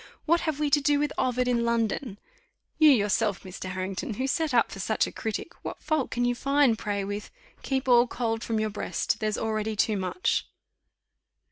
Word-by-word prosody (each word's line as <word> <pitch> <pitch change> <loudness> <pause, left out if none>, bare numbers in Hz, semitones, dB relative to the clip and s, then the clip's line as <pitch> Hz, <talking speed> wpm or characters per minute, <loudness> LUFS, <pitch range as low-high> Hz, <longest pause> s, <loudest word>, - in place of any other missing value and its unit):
What 335 +2 +4
have 310 -3 -2
we 295 -1 0
to 290 - +4
do 290 +1 +3
with 295 0 0
Ovid 250 0 0
in 240 -1 +2
London? 235 -1 -1 0.6
You, 310 -1 +8
yourself, 210 -4 +2
Mr. 185 0 -7
Harrington, 190 +6 -4
who 260 - -2
set 310 +3 0
up 240 -2 +3
for 195 - -8
such 215 +3 +1
a - - -6
critic, 220 +9 -4
what - - -6
fault 310 -4 0
can 245 0 0
you 245 - +2
find, 275 -1 +3
pray, 205 -2 -2
with 205 +1 -5 0.3
'Keep 265 -1 -2
all 245 -1 +6
cold 225 -2 -2
from 225 -1 -1
your 215 0 -1
breast, 205 - -2
there's 215 -1 -1
already 220 -1 -1
too 210 0 +1
much? 190 - -1
235 Hz, 195 wpm, -27 LUFS, 210-275 Hz, 0.6 s, You